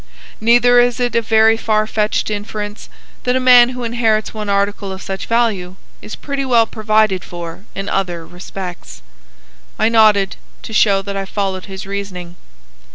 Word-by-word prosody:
Neither 245 +2 +5
is 245 +1 +2
it 245 -1 0
a 230 - +3
very 220 0 +4
far 215 -1 0
fetched 215 0 -1
inference 210 0 -5 0.3
that 250 0 +1
a - - +2
man 250 -1 +7
who 250 -1 -6
inherits 225 -2 0
one 210 -2 -5
article 200 0 -1
of 190 - -7
such 195 0 -5
value 215 -6 0 0.3
is 215 - -8
pretty 280 -1 -4
well 240 -3 +3
provided 215 -3 +1
for 175 +2 -8
in 195 0 -5
other 175 -5 -2
respects." 175 - -9 0.7
I 220 +1 +2
nodded, 215 -4 +3 0.3
to 220 - -8
show 200 -2 +3
that 200 0 -5
I 195 0 -3
followed 190 -2 -3
his 190 -1 -8
reasoning. 190 -3 -6
210 Hz, 160 wpm, -17 LUFS, 195-230 Hz, 0.7 s, man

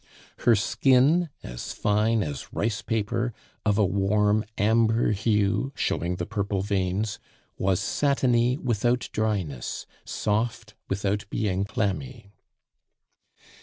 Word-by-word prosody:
Her 120 -2 +5
skin, 135 - +3
as - - -6
fine 105 +2 +2
as 75 -3 -6
rice 105 -1 -1
paper, 115 +1 -1 0.3
of 105 -2 +2
a 105 - +4
warm 105 +3 +2
amber 115 +2 +3
hue 105 +4 +1
showing 90 -3 -1
the 90 -1 -3
purple 100 -2 -2
veins, 100 +2 -1 0.4
was 95 -1 +2
satiny 125 -3 +2
without 120 -1 0
dryness, 95 - -2 0.2
soft 110 +1 -2 0.2
without 100 +1 -1
being 100 -3 0
clammy. 110 +2 -3
105 Hz, 105 wpm, -26 LUFS, 100-115 Hz, 0.4 s, Her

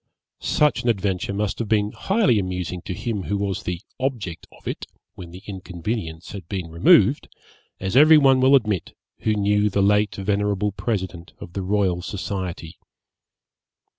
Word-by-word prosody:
Such 150 -4 +2
an 120 - 0
adventure 100 -4 0
must 100 0 -2
have 115 - -2
been 105 -1 +2
highly 190 - +2
amusing 90 -2 -3
to - - -3
him 110 +1 -3
who 100 - -1
was 100 -2 -2
the 90 -1 -4 0.2
object 120 -11 -3
of - - -15
it, - - -4 0.3
when 90 -2 -10
the 90 +3 -12
inconvenience 95 -2 -5
had 95 -5 -9
been 90 -4 -4
removed, 85 +1 +4 0.5
as 95 +3 -3
every 155 +3 +8
one 135 -3 +5
will 135 +2 +6
admit 105 -9 0 0.2
who 110 - 0
knew 105 0 +2
the 100 0 +1
late 105 0 +3
venerable 100 +1 0
President 95 -5 -4
of 85 - -10
the 100 - -3
Royal 95 -2 +1
Society. 90 -4 -5
100 Hz, 160 wpm, -23 LUFS, 90-110 Hz, 0.5 s, every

